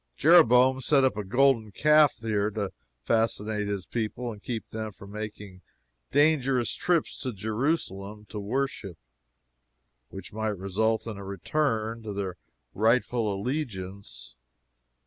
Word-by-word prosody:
Jeroboam 130 -5 +6
set 135 +1 +3
up 130 -4 +2
a 105 - -3
golden 120 +1 +2
calf 150 +5 +5
here 105 -2 0
to 100 -2 -3 0.3
fascinate 110 -2 0
his 100 -2 -3
people 120 +1 -3
and 105 -2 -10
keep 115 -1 -4
them 110 -1 -5
from 100 0 -13
making 105 -3 -7 0.5
dangerous 135 - +2
trips 175 -3 0
to 130 - -2
Jerusalem 105 - -2
to 105 - -5
worship, 105 - -3 1.1
which 95 0 -10
might 110 -1 -2
result 110 +4 0
in 110 -3 -6
a 100 - -8
return 115 - -1
to 110 -2 -6
their 95 -3 -4 0.4
rightful 115 0 +2
allegiance. 95 - -5
110 Hz, 125 wpm, -27 LUFS, 100-125 Hz, 1.1 s, Jeroboam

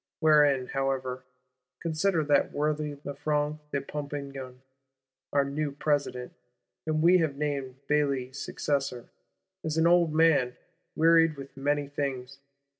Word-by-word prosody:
Wherein, 150 -4 +4
however, 130 -1 -2 0.5
consider 165 +1 0
that 145 -1 +2
worthy 150 0 -1
Lafranc 150 +1 -1
de 140 - -1
Pompignan, 140 -3 -6 0.7
our 140 -1 +2
new 145 +1 -2
President, 145 -4 -1 0.5
whom 155 0 +1
we 180 +2 +6
have 155 -4 -1
named 140 -3 -2
Bailly's 140 -3 0
successor, 135 -4 -2 0.5
is 160 0 -2
an 160 - +3
old 170 -1 +4
man, 150 -6 +3 0.4
wearied 165 -1 +4
with 135 0 -10
many 145 +1 0
things. 140 -2 -4
145 Hz, 115 wpm, -28 LUFS, 135-155 Hz, 0.7 s, we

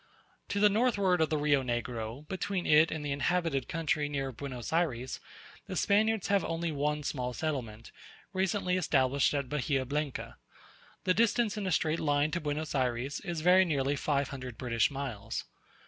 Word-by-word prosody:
To 200 - -1
the 210 - +7
northward 200 -5 +2
of 160 - +2
the 155 - +1
Rio 145 -2 +3
Negro, 120 +2 -4
between 190 -1 -2
it 155 +2 +6
and 155 -1 -4
the 145 - -2
inhabited 160 -1 0
country 160 -2 -1
near 135 -2 -2
Buenos 125 +1 -6
Ayres, 130 -7 0 0.5
the - - -5
Spaniards 215 0 +2
have 200 -1 +3
only 165 +1 -2
one 150 +1 -1
small 125 -3 -2
settlement, 120 -7 -4 0.4
recently 185 -1 +1
established 140 -5 +2
at 140 -2 -1
Bahia 135 -1 0
Blanca. 145 +1 -3 0.7
The 185 - +3
distance 230 0 +2
in 205 -2 -3
a - - 0
straight 160 0 +1
line 145 0 +1
to 170 - -2
Buenos 150 +1 -3
Ayres 130 +1 -1
is 175 -4 -4
very 180 +3 +6
nearly 145 -5 0
five 140 -1 0
hundred 130 -4 -7
British 115 -3 +1
miles. 135 -7 -4
150 Hz, 165 wpm, -31 LUFS, 135-180 Hz, 0.7 s, the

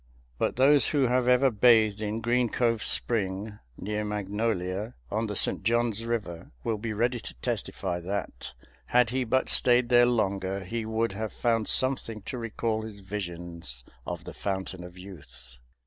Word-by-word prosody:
But - - 0
those 140 +3 +5
who 145 -3 +2
have 125 0 +1
ever 125 +1 +5
bathed 110 -2 +4
in 110 +1 -2
Green 120 +1 +1
Cove 115 -2 +1
Spring, 105 -1 -1 0.2
near 105 +2 -3
Magnolia, 105 0 -2 0.2
on 110 +2 -1
the 105 - -4
St. - - +3
John's 115 0 0
River, 105 -8 -4
will 110 -2 -1
be 115 +1 -4
ready 120 +3 0
to - - -9
testify 85 +7 -3
that, 90 -7 -5 0.3
had 120 -1 +3
he 130 0 0
but 130 +2 +1
stayed 125 -1 +3
there 120 -1 +6
longer, 100 -4 0
he 110 +4 -4
would 110 0 0
have 110 +1 -4
found 115 0 0
something 120 -5 +4
to 125 - -5
recall 115 -1 -2
his 110 -2 -8
visions 85 -9 -6 0.2
of - - -5
the - - -9
Fountain 95 -2 -4
of 90 0 -11
Youth. 70 -9 -12
110 Hz, 165 wpm, -27 LUFS, 95-120 Hz, 0.3 s, there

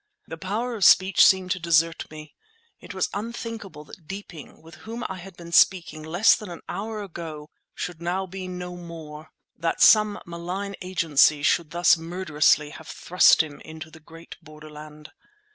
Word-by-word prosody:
The 165 - -7
power 210 +8 -3
of 215 -4 -3
speech 185 +2 +6
seemed 185 -1 +4
to 180 - -1
desert 165 -1 +1
me. 155 -1 -11 0.5
It - - -11
was 190 - 0
unthinkable 215 -6 -6
that 155 +2 -15
Deeping, 195 -7 -10
with 165 +1 -15
whom 230 +2 -7
I 190 - -7
had 185 0 -12
been 170 -1 -11
speaking 170 -2 +3
less 175 +7 +3
than 210 - -9
an 170 - -9
hour 215 +1 -5
ago, 160 -5 -9 0.2
should 170 -2 -6
now 180 +3 -2
be 190 0 -8
no 180 -1 -7
more; 160 -3 -10 0.3
that 165 0 -2
some 210 -1 +5
malign 180 +4 -5
agency 160 -5 +2
should 160 +1 +2
thus 175 +1 +4
murderously 155 -3 +1
have 160 - -12
thrust 180 -2 +4
him 150 -2 -10
into 160 0 -10
the 160 - -14
great 165 +1 -13
borderland. 155 -1 -13
170 Hz, 165 wpm, -24 LUFS, 155-190 Hz, 0.5 s, speech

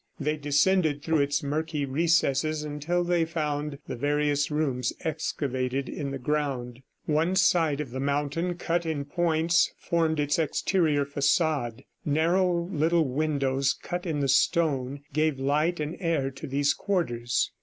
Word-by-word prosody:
They 150 +1 0
descended 150 +1 +2
through 160 -1 +1
its 140 0 +1
murky 150 +1 -2
recesses 155 0 +1
until 150 +4 -1
they 175 -1 +2
found 150 -3 -2
the - - -4
various 145 +2 +1
rooms 135 -6 0
excavated 135 -4 -2
in 140 -2 -4
the 135 - -4
ground. 130 -3 -2 0.2
One 160 +4 +1
side 165 -5 +3
of 145 -5 -4
the 130 - -4
mountain 145 +5 -1
cut 170 0 -1
in 155 -4 -3
points 165 +1 +2
formed 160 -2 0
its 145 +2 +1
exterior 155 -2 +1
facade. 140 -3 0 0.2
Narrow 170 +3 +1
little 165 -1 +2
windows, 135 -1 0
cut 175 +1 -4
in 150 -3 -1
the 140 - +1
stone, 140 -1 +1
gave 155 -1 +1
light 150 +5 +1
and 150 +2 -3
air 160 -7 0
to 130 - -8
these 140 +1 +2
quarters. 120 - -1
150 Hz, 145 wpm, -27 LUFS, 140-165 Hz, 0.2 s, side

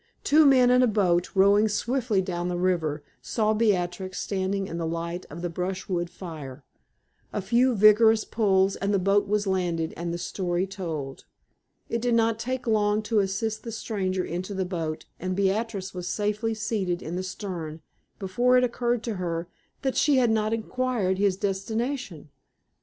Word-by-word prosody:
Two 305 +1 +5
men 255 -2 +6
in 250 0 +5
a 250 - +5
boat, 180 -5 +2
rowing 200 +3 +5
swiftly 220 -1 0
down 175 -1 -3
the 180 -1 -2
river, 165 -5 0 0.2
saw 215 -2 0
Beatrix 185 -4 0
standing 195 0 -1
in 170 - -5
the 165 - -2
light 170 +2 -4
of 165 +4 -8
the - - 0
brushwood 180 0 -3
fire. 155 -7 -9 0.7
A - - -2
few 240 +5 +2
vigorous 215 +2 +6
pulls 195 -3 +2
and 200 +1 -1
the - - +4
boat 195 +2 +2
was 210 +1 +1
landed, 175 -4 -1
and 170 +1 -4
the 170 - -2
story 175 0 -2
told. 165 -8 -6 0.6
It 230 - -2
did 240 -1 +2
not 225 -1 +2
take 255 +2 -3
long 210 -1 +2
to 215 0 +1
assist 200 +3 -1
the 230 - -7
stranger 190 -4 -2
into 185 +4 -4
the 190 -1 -1
boat, 165 -4 -4
and 185 +1 -2
Beatrix 200 0 -1
was 180 -1 -5
safely 210 +3 -1
seated 200 -5 -2
in 165 - -5
the 185 - -2
stern 180 -4 -6 0.4
before 240 +7 +2
it 250 - +4
occurred 240 -1 0
to 225 -4 -3
her 170 -1 -3 0.3
that 265 -1 0
she 290 -1 +3
had 240 -3 +3
not 215 -1 +1
inquired 225 -4 -1
his 200 -2 +2
destination. 200 - -3
195 Hz, 170 wpm, -26 LUFS, 180-225 Hz, 0.7 s, men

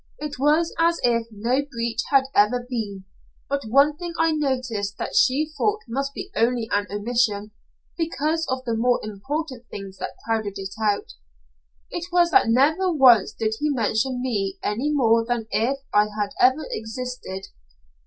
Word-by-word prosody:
It 295 -3 -6
was 305 +4 +2
as 335 +1 +3
if 230 -1 +2
no 230 +5 0
breach 235 -4 -3
had 275 -1 +5
ever 240 +4 +3
been, 205 -6 -4 0.4
but 280 0 -1
one 280 +6 +4
thing 345 0 -5
I 325 0 +3
noticed 255 -9 -2
that - - -4
she 300 +4 +3
thought 425 0 0
must 275 +4 -3
be 385 +1 -6
only 235 0 +1
an 205 0 +1
omission, 210 -1 0 0.5
because 325 0 -1
of 260 0 -2
the 230 -2 -1
more 245 +2 +2
important 250 +5 -5
things 195 -1 -8
that - - -6
crowded 220 -3 -1
it 195 0 -6
out. 205 -2 0 0.8
It 345 +1 -5
was 350 -1 +3
that 395 -12 +5
never 310 +10 +3
once 250 - +6
did 220 -1 -2
he 300 - 0
mention 250 0 0
me 200 -6 -1
any 245 +9 -1
more 230 -5 +3
than 235 -1 -2
if 255 +5 +1 0.2
I 210 0 +5
had 210 -1 -3
never 260 +5 +4
existed. 220 - -6
245 Hz, 165 wpm, -23 LUFS, 215-290 Hz, 0.8 s, once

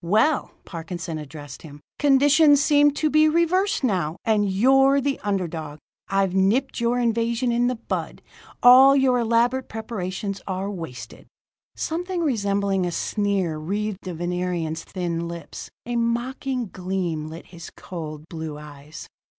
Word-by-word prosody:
"Well," 220 - +2 0.2
Parkinson 170 -1 -6
addressed 145 -2 -10
him, 145 -2 -12 0.2
"conditions 290 +1 +5
seem 290 -1 +5
to 310 - +1
be 310 +1 +4
reversed 340 +3 +1
now, 180 -9 0
and 210 -3 +2
you're 270 +7 +4
the 275 0 -1
underdog. 170 -7 -3 0.3
I've 195 -2 +1
nipped 205 +10 +1
your 235 +1 +1
invasion 235 +1 0
in 240 +1 +2
the 250 - 0
bud. 225 - -5 0.4
All 260 +3 +8
your 260 -2 +3
elaborate 240 +3 +1
preparations 200 -3 -5
are 190 +1 -3
wasted." 125 - -8 0.5
Something 355 +2 -3
resembling 200 - 0
a 175 - -1
sneer 195 -5 -1
wreathed 200 +5 -3
the 180 -2 -6
Venerian's 175 -2 -3
thin 170 -2 -3
lips; 170 -2 -8 0.2
a 240 +1 -3
mocking 240 +1 -2
gleam 180 -4 -3
lit 160 +2 -9
his 170 0 -9
cold, 155 -4 -8
blue 160 -3 -6
eyes. 150 0 -11
200 Hz, 135 wpm, -23 LUFS, 170-255 Hz, 0.5 s, All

